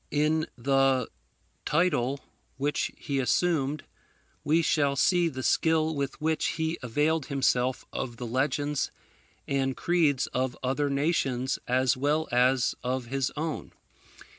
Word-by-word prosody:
In 155 +2 +1
the 135 0 +2 0.5
title 140 -5 +1 0.4
which 145 +2 -1
he 140 -2 -2
assumed, 145 +2 +1 0.6
we 160 +3 +3
shall 145 -3 +2
see 175 +4 +3
the 130 -3 -6
skill 160 +5 +2
with 140 -2 -3
which 160 +1 0
he 160 +1 -1
availed 150 +6 0
himself 130 -2 +1
of 120 -2 -4
the 120 - -5
legends 140 +4 0 0.6
and 135 -1 0
creeds 155 -6 +2
of 130 0 -1
other 135 +3 0
nations 140 -3 0
as 130 0 +2
well 150 +4 0
as 125 +1 +3
of 125 0 -2
his 135 -1 0
own. 155 0 -4
140 Hz, 125 wpm, -28 LUFS, 130-155 Hz, 0.6 s, we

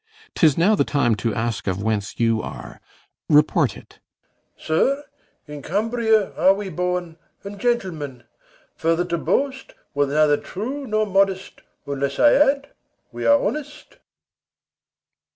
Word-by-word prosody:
'Tis 155 -5 +3
now 180 +6 +4
the - - +3
time 130 -6 +1
To 110 +2 -1
ask 115 -2 -3
of 95 +1 -2
whence 105 -2 -2
you 115 -1 +2
are. - - -9 0.5
Report 150 0 +3
it. - - -17 0.6
BELARIUS. - - -17
Sir, 275 - +1 0.4
In 150 -1 -9
Cambria 220 - +1
are 190 +1 +4
we 200 -1 -5
born, 180 -1 -3 0.3
and 200 0 -8
gentlemen; 175 - -2 0.5
Further 165 +2 +1
to 170 -1 -2
boast 265 +4 -1 0.2
were 145 0 +1
neither 150 +1 +3
true 260 - -6
nor 215 -1 +1
modest, 195 -1 0 0.2
Unless 140 -1 -3
I 295 - +5
add 280 0 +2 0.4
we - - -3
are 285 0 +6
honest. 300 - -5
180 Hz, 135 wpm, -22 LUFS, 145-225 Hz, 0.6 s, are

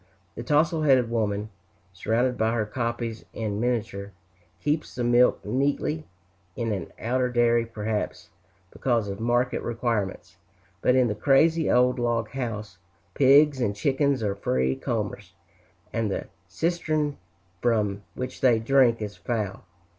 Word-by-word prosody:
The - - -7
tousle 155 +2 +2
headed 130 -6 +3
woman, 105 -2 -1 0.4
surrounded 115 +7 0
by 110 -1 +1
her 110 -2 0
copies 115 0 -3
in 105 -2 -3
miniature, 110 -4 -2 0.5
keeps 150 +1 -2
the 125 - -2
milk 120 +1 +3
neatly, 145 +4 -1 0.5
in 115 -2 -2
an 95 -5 -4
outer 125 +2 0
dairy, 120 -1 +2
perhaps 110 -1 -4 0.4
because 120 -5 0
of 100 +1 -5
market 120 +2 +1
requirements; 105 -7 -3 0.4
but 125 - +3
in 130 -1 +4
the 105 - -1
crazy 155 +8 +3
old 125 +1 +3
log 115 -2 0
house, 110 -8 -5 0.3
pigs 140 - +5
and 100 -3 0
chickens 135 +1 +1
are 100 -2 0
free 65 -9 0
comers, - - -4 0.6
and 115 -2 0
the - - -3 0.2
cistern 155 - -1 0.4
from 105 -4 +1
which 125 - -6
they 120 -3 +5
drink 115 -1 +3
is 105 -1 -6
foul. 105 -6 -3
120 Hz, 135 wpm, -26 LUFS, 105-130 Hz, 0.6 s, pigs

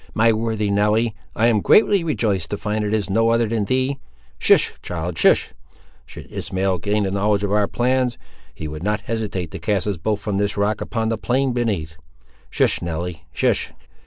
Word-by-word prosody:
"My 115 +1 +4
worthy 110 -2 -1
Nelly! 105 +3 +2 0.2
I 110 - +2
am 115 -3 +3
greatly 200 - +4
rejoiced 105 - -1
to 105 - -2
find 105 +1 -2
it 105 - -2
is 110 -2 0
no 115 +4 +2
other 115 0 +3
than 110 -2 -1
thee. 130 +4 0 0.4
Hist! - - +3
child, 85 -1 -4
hist! - - +3 0.5
Should - - -10
Ishmael 95 -1 -1
gain 105 +3 0
a 95 - -2
knowledge 100 +1 +1
of 100 - -1
our 105 -1 +3
plans, 125 0 0 0.4
he 80 - -6
would 75 0 -7
not 105 +2 -1
hesitate 105 -6 -3
to - - -6
cast 100 -3 0
us 100 -3 -1
both 105 +3 -1
from 100 -1 -2
this 100 +1 -1
rock, 105 +1 0
upon 110 -1 -2
the 115 -1 -2
plain 130 +2 +1
beneath. 100 -10 -2 0.5
Hist! - - +1
Nelly, 85 0 -5
hist!" - - 0
105 Hz, 190 wpm, -21 LUFS, 95-115 Hz, 0.5 s, My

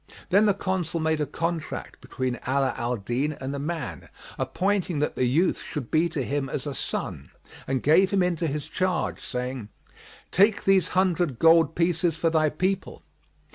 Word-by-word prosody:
Then 200 +4 +5
the 200 - +3
Consul 185 -4 -2
made 160 -1 +1
a 150 - 0
contract 165 +2 -4
between 130 -2 -3
Ala 135 0 +1
al 120 +1 -1
Din 125 +9 -1
and 135 -1 -5
the 140 - -3
man, 155 -1 -5 0.3
appointing 190 -3 0
that 150 - 0
the 125 - 0
youth 155 +9 +2
should 140 -7 -6
be 165 +2 +3
to 155 -5 -2
him 140 +1 -2
as 135 - -4
a 145 - -3
son, - - -4 0.4
and 130 -1 -1
gave 185 +6 +5
him 195 -1 +2
into 175 -2 0
his 150 0 -3
charge, 185 -3 -1
saying, 125 -3 -5 0.6
"Take 200 +3 +4
these 190 -3 +4
hundred 175 -7 +2
gold 165 +1 +5
pieces 170 -1 +1
for 165 0 +1
thy 155 -1 +3
people." 185 +5 -2
160 Hz, 175 wpm, -26 LUFS, 140-180 Hz, 0.6 s, Then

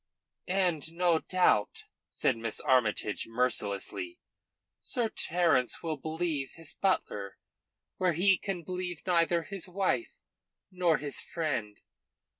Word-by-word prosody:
"And 175 -4 +1
no 170 -1 +3
doubt," 180 - +2 0.3
said - - +1
Miss 115 -1 -3
Armytage 110 -5 +1
mercilessly, 125 - 0 0.6
"Sir 235 -3 0
Terence 165 - +1
will 160 -2 -1
believe 155 -1 -3
his 165 -2 -6
butler 105 - -1 0.6
where 180 -2 +2
he 190 +4 +5
can 190 -4 -4
believe 180 -1 -4
neither 170 -2 +2
his 195 +1 -5
wife 195 - 0 0.6
nor 180 -4 +2
his 145 -1 -3
friend." 135 -11 -3
165 Hz, 110 wpm, -30 LUFS, 130-185 Hz, 0.6 s, he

